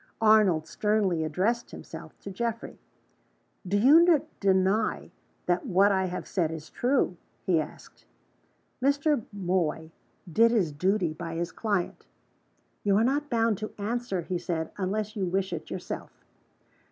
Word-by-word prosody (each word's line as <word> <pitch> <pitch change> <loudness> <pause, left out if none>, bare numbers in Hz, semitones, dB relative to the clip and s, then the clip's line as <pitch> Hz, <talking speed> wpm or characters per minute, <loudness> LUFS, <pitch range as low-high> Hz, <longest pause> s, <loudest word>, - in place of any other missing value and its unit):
Arnold 215 -8 +4
sternly 200 -3 0
addressed 195 +10 0
himself - - -10
to 200 - -7
Geoffrey. 230 +3 -4 0.9
"Do 200 +3 +1
you 310 +7 +6
deny 195 +2 +1 0.3
that 175 0 0
what 195 +3 +4
I 190 -1 +2
have 180 0 -4
said 175 -6 0
is 160 -1 -8
true?" 250 -8 +1 0.3
he 170 -4 +2
asked. - - -11 0.7
Mr. 285 -1 +2
Moy 175 -5 -1 0.4
did 230 +5 +6
his 205 -9 +1
duty 180 +2 0
by 165 +1 -6
his 170 +1 -2
client. 205 -5 -2 0.8
"You 200 -1 +3
are 220 - +4
not 285 +4 0
bound 225 -4 +1
to 215 - -6
answer," 220 -2 -2
he 180 +1 -3
said, 165 -2 -3
"unless 210 +3 -2
you 195 -3 -1
wish 190 +2 -1
it - - -6
yourself." - - -5
195 Hz, 140 wpm, -28 LUFS, 175-225 Hz, 0.9 s, you